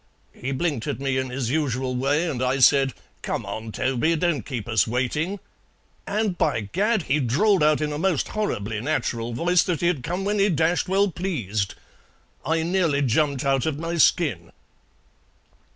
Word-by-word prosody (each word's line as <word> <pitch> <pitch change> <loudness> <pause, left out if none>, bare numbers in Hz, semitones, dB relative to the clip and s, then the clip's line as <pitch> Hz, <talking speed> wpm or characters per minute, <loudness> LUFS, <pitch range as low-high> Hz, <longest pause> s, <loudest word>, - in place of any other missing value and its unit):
He 135 - -5
blinked 135 -3 -2
at - - -3
me 135 -1 0
in 130 0 -3
his 125 -2 -3
usual 130 -4 -1
way, 145 +6 +1
and 135 -6 -3
I 130 +1 +1
said, 135 0 +4 0.3
'Come - - -3
on, 110 0 -6
Toby; 130 +7 0
don't 170 -2 0
keep 120 -6 -5
us 110 -6 +2
waiting;' 150 - -1 0.7
and, 205 -3 -1
by - - +1
Gad! 200 - 0
he 150 +1 +1
drawled 160 - +2
out 150 0 +3
in 150 -1 -1
a 145 - -4
most 175 -4 0
horribly 110 - -2
natural 120 -4 -2
voice 175 +8 +3
that 175 -4 -2
he'd 170 -5 +1
come 180 +8 -3
when 205 +1 0
he 200 +1 +4
dashed 170 +2 +1
well 195 +1 +2
pleased! 110 - -2 0.7
I 160 +3 0
nearly 165 -5 +1
jumped 140 +2 +1
out 135 +2 +1
of 150 -3 -1
my 165 +2 -3
skin!" 130 - +2
145 Hz, 170 wpm, -24 LUFS, 125-175 Hz, 0.7 s, said